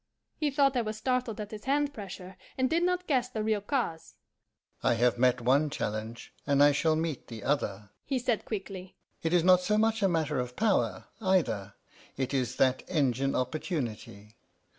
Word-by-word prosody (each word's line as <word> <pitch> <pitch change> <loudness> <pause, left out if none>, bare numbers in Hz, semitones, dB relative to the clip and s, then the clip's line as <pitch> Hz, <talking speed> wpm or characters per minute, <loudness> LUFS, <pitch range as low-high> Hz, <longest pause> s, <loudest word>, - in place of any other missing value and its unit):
He 305 -2 0
thought 275 -1 +2
I 245 - +3
was 215 -1 -4
startled 250 -1 -1
at 210 -1 -6
his 215 -1 -8
hand 285 +1 +1
pressure, 190 -5 -8 0.2
and 260 0 +2
did 330 +5 +1
not 360 0 0
guess 255 -6 +1
the 220 -4 -3
real 215 -1 +1
cause. 205 - -3 0.7
"'I 120 - +3
have 120 +1 +2
met 125 0 +3
one 140 +5 +3
challenge, 110 -3 -5
and 140 0 +4
I 145 - +7
shall 155 +2 +2
meet 160 -3 -3
the 110 -3 -8
other,' 105 -8 -1
he 270 - -1
said 245 -3 0
quickly. 190 -3 -6 0.3
'It 160 - -1
is 175 -2 +4
not 180 0 +6
so 210 +4 +1
much 220 0 +2
a 195 - +3
matter 155 -5 0
of 125 0 -4
power, 215 -2 +1 0.2
either; 115 - +1 0.4
it 130 0 -2
is 130 -3 0
that 130 -1 +2
engine 135 -5 +1
opportunity. 120 - -4
175 Hz, 185 wpm, -29 LUFS, -, 0.7 s, I